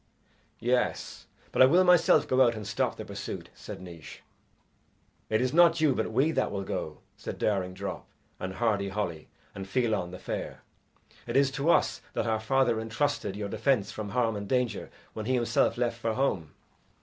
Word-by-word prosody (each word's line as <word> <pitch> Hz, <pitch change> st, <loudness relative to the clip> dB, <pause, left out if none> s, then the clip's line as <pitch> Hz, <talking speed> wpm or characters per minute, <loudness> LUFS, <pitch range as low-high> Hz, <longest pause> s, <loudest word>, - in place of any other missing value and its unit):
"Yes, 125 Hz, +2 st, -1 dB, 0.2 s
but -, -, +2 dB
I 130 Hz, -, +10 dB
will 175 Hz, +7 st, +5 dB
myself 180 Hz, -2 st, +5 dB
go 130 Hz, 0 st, +3 dB
out 120 Hz, -2 st, +5 dB
and 105 Hz, -1 st, -6 dB
stop -, -, -1 dB
the -, -, -7 dB
pursuit," -, -, -6 dB
said -, -, -9 dB
Naois. 85 Hz, -4 st, -10 dB, 1.1 s
"It 110 Hz, +1 st, +2 dB
is 130 Hz, 0 st, 0 dB
not 170 Hz, 0 st, +6 dB
you, 155 Hz, -3 st, +4 dB
but 110 Hz, -2 st, -2 dB
we 135 Hz, +8 st, +3 dB
that -, -, 0 dB
will 100 Hz, -1 st, -3 dB
go," -, -, -5 dB
said -, -, -7 dB
Daring 95 Hz, -3 st, 0 dB
Drop, 100 Hz, +1 st, -5 dB, 0.3 s
and 95 Hz, 0 st, -5 dB
Hardy 100 Hz, -3 st, 0 dB
Holly, 90 Hz, -6 st, -3 dB, 0.3 s
and 95 Hz, -1 st, -7 dB
Fiallan 110 Hz, -5 st, 0 dB
the 90 Hz, -, -8 dB
Fair; -, -, -5 dB, 0.6 s
"it -, -, 0 dB
is 140 Hz, -1 st, +4 dB
to 140 Hz, +4 st, -1 dB
us -, -, +3 dB
that -, -, -1 dB
our 110 Hz, -1 st, +1 dB
father 120 Hz, 0 st, +2 dB
entrusted 110 Hz, -2 st, -1 dB
your 105 Hz, 0 st, -3 dB
defence 115 Hz, -6 st, +1 dB
from 105 Hz, -1 st, -5 dB
harm 115 Hz, -1 st, +1 dB
and 100 Hz, -1 st, -5 dB
danger 125 Hz, -3 st, 0 dB, 0.2 s
when 110 Hz, 0 st, -5 dB
he 130 Hz, -, +2 dB
himself 120 Hz, -1 st, +2 dB
left 120 Hz, -1 st, -1 dB
for 115 Hz, -1 st, -1 dB
home." 95 Hz, -, -1 dB
115 Hz, 185 wpm, -28 LUFS, 100-130 Hz, 1.1 s, I